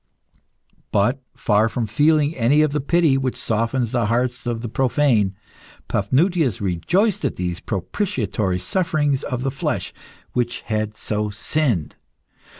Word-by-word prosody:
But, 120 Hz, +7 st, +2 dB
far 105 Hz, +1 st, +2 dB
from 115 Hz, +1 st, -2 dB
feeling 150 Hz, +7 st, +2 dB
any 135 Hz, +6 st, +4 dB
of 155 Hz, -, +1 dB
the 150 Hz, 0 st, -1 dB
pity 155 Hz, -2 st, +3 dB
which 130 Hz, -2 st, -2 dB
softens 115 Hz, +2 st, 0 dB
the 120 Hz, -4 st, +1 dB
hearts 125 Hz, +2 st, -1 dB
of 115 Hz, -1 st, -2 dB
the -, -, -2 dB
profane, 120 Hz, -5 st, +2 dB, 0.5 s
Paphnutius 160 Hz, -, +1 dB
rejoiced 175 Hz, -, +1 dB
at 140 Hz, -, -1 dB
these 90 Hz, -1 st, -3 dB
propitiatory 105 Hz, -, -2 dB
sufferings 145 Hz, -, 0 dB
of 125 Hz, 0 st, -3 dB
the 135 Hz, -, 0 dB
flesh 135 Hz, -, -2 dB, 0.4 s
which 120 Hz, 0 st, -1 dB
had 110 Hz, -1 st, -2 dB
so 105 Hz, 0 st, -1 dB
sinned. 105 Hz, -, -1 dB
120 Hz, 135 wpm, -22 LUFS, 105-145 Hz, 0.5 s, any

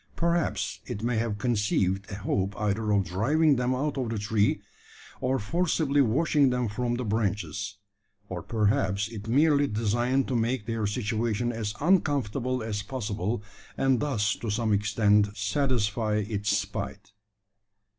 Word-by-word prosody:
Perhaps 170 Hz, -1 st, 0 dB
it 105 Hz, -, -5 dB
may 120 Hz, -1 st, 0 dB
have 110 Hz, -2 st, -1 dB
conceived 100 Hz, -3 st, 0 dB
a 100 Hz, -, -5 dB
hope 100 Hz, -1 st, -2 dB
either 105 Hz, +1 st, 0 dB
of 100 Hz, -2 st, +3 dB
driving 140 Hz, -, +2 dB
them 125 Hz, 0 st, 0 dB
out 145 Hz, +1 st, -1 dB
of 125 Hz, -3 st, -1 dB
the 115 Hz, -, -2 dB
tree, 105 Hz, 0 st, +1 dB, 0.6 s
or 130 Hz, +1 st, +1 dB
forcibly 150 Hz, -, +1 dB
washing 140 Hz, +3 st, +3 dB
them 125 Hz, -1 st, 0 dB
from 120 Hz, +3 st, -1 dB
the 125 Hz, 0 st, -3 dB
branches; 105 Hz, -3 st, -2 dB, 0.5 s
or 90 Hz, -3 st, -5 dB
perhaps 105 Hz, -2 st, +1 dB
it 110 Hz, -2 st, -8 dB
merely 145 Hz, +3 st, +4 dB
designed 120 Hz, +5 st, +1 dB
to 130 Hz, -, -1 dB
make 115 Hz, -1 st, 0 dB
their 115 Hz, -2 st, -1 dB
situation 110 Hz, +1 st, -1 dB
as 110 Hz, -3 st, -3 dB
uncomfortable 140 Hz, -, +1 dB
as 105 Hz, -2 st, -2 dB
possible, 105 Hz, -2 st, -3 dB, 0.3 s
and 135 Hz, -2 st, +3 dB
thus 110 Hz, -8 st, +1 dB
to 115 Hz, -, -5 dB
some 110 Hz, +1 st, +1 dB
extent 105 Hz, 0 st, +2 dB
satisfy 110 Hz, -2 st, 0 dB
its 105 Hz, -1 st, -1 dB
spite. -, -, -5 dB
110 Hz, 145 wpm, -27 LUFS, 105-130 Hz, 0.6 s, merely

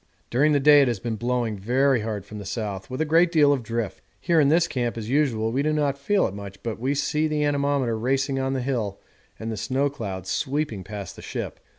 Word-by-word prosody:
During 140 Hz, +6 st, +3 dB
the 145 Hz, -, +3 dB
day 145 Hz, +1 st, +7 dB
it 135 Hz, -, +3 dB
has 120 Hz, -5 st, -1 dB
been 115 Hz, +3 st, -3 dB
blowing 120 Hz, -2 st, -1 dB
very 130 Hz, +5 st, +2 dB
hard 105 Hz, -3 st, -4 dB
from 105 Hz, +1 st, -8 dB
the -, -, -7 dB
south, 100 Hz, -2 st, -4 dB
with 130 Hz, +3 st, -3 dB
a -, -, +2 dB
great 165 Hz, +3 st, +4 dB
deal 150 Hz, -4 st, +5 dB
of 135 Hz, -, -1 dB
drift. 115 Hz, -2 st, -3 dB, 0.2 s
Here 170 Hz, -2 st, +2 dB
in 140 Hz, -2 st, +4 dB
this 170 Hz, +3 st, +4 dB
camp 120 Hz, -6 st, -2 dB
as 110 Hz, +1 st, -5 dB
usual 120 Hz, -6 st, +1 dB
we 130 Hz, +4 st, 0 dB
do 155 Hz, +2 st, +1 dB
not 145 Hz, -2 st, +1 dB
feel 195 Hz, +8 st, +1 dB
it -, -, -3 dB
much, 100 Hz, -1 st, -9 dB
but 115 Hz, -2 st, -4 dB
we 135 Hz, +4 st, 0 dB
see 150 Hz, +2 st, +1 dB
the 150 Hz, -1 st, 0 dB
anemometer 140 Hz, -4 st, +1 dB
racing 135 Hz, +4 st, 0 dB
on 135 Hz, 0 st, -1 dB
the 130 Hz, -2 st, -2 dB
hill 115 Hz, -7 st, -2 dB, 0.4 s
and 115 Hz, 0 st, -5 dB
the 110 Hz, -, -4 dB
snow 135 Hz, +6 st, 0 dB
clouds 95 Hz, -8 st, -5 dB
sweeping 135 Hz, -8 st, -1 dB
past 100 Hz, -3 st, -7 dB
the -, -, -9 dB
ship. -, -, -5 dB
130 Hz, 240 wpm, -25 LUFS, 110-145 Hz, 0.4 s, day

